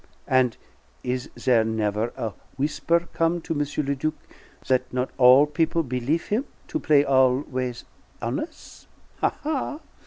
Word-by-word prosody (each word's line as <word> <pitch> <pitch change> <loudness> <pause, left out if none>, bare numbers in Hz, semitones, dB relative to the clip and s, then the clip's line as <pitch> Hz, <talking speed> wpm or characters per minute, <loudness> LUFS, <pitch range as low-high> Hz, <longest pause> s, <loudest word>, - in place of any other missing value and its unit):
And 130 -2 +3 0.5
is 125 0 -2
there 120 -4 +3
never 110 0 -1
a 115 -5 -3 0.2
w'isper 165 +4 +1
come 165 +1 +1
to 165 - -3
M. 150 - -2 0.3
le 140 - +1
Duc 155 +3 -2 0.5
that 130 -1 +1
not 125 +1 -1
all 130 +3 +8
people 160 +2 0
belief 130 +5 -1
him 230 +7 +1 0.2
to 315 - -1
play 145 - +4
always 130 -2 +1 0.3
hones'? 125 - -5 0.3
Ha, - - +3
ha! 295 0 -2
130 Hz, 135 wpm, -25 LUFS, 125-160 Hz, 0.5 s, all